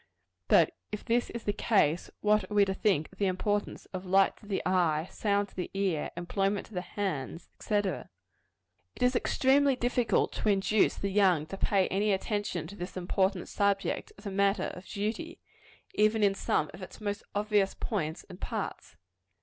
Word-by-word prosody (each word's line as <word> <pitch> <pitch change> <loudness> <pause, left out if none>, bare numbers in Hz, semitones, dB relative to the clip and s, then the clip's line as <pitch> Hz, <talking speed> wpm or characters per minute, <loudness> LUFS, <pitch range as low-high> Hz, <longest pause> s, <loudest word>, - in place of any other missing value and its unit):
But - - +5 0.2
if 210 - -5
this 240 0 +1
is 235 - -6
the 205 - 0
case, 195 -6 +2
what 210 0 +2
are 210 - -4
we 205 -1 +6
to 190 - -1
think 190 -7 +1
of 190 - -19
the 200 - +2
importance 205 +3 -1
of 185 0 -4
light 190 +1 +3
to 210 - -16
the 200 - -2
eye, 170 -3 +2
sound 205 -1 0
to - - -22
the 180 - -3
ear, 190 -6 0
employment 195 +3 -1
to - - -17
the 180 - -2
hands, 175 -5 -4
&c.? 215 - -2
It 205 -2 +2 1.1
is 250 0 +3
extremely 270 +3 +3
difficult 245 -1 +1
to 215 - -1
induce 200 +1 +3
the 200 - -3
young 185 -6 +3
to 175 - -7
pay 195 -1 +2
any 200 +2 +2
attention 195 -4 -2
to 190 +5 -9
this 185 -1 -6
important 190 +1 0
subject, 200 -1 0
as 200 - -15
a 200 - -3
matter 200 0 +1
of 180 +1 -11
duty, 225 - -3 0.6
even 215 +1 +3
in 200 -1 +4
some 155 -5 0
of - - -11
its 185 - -9
most 205 -1 -3
obvious 205 -1 +1
points 175 -6 -3
and 185 -1 -12
parts. - - -5
200 Hz, 180 wpm, -30 LUFS, 185-210 Hz, 1.1 s, we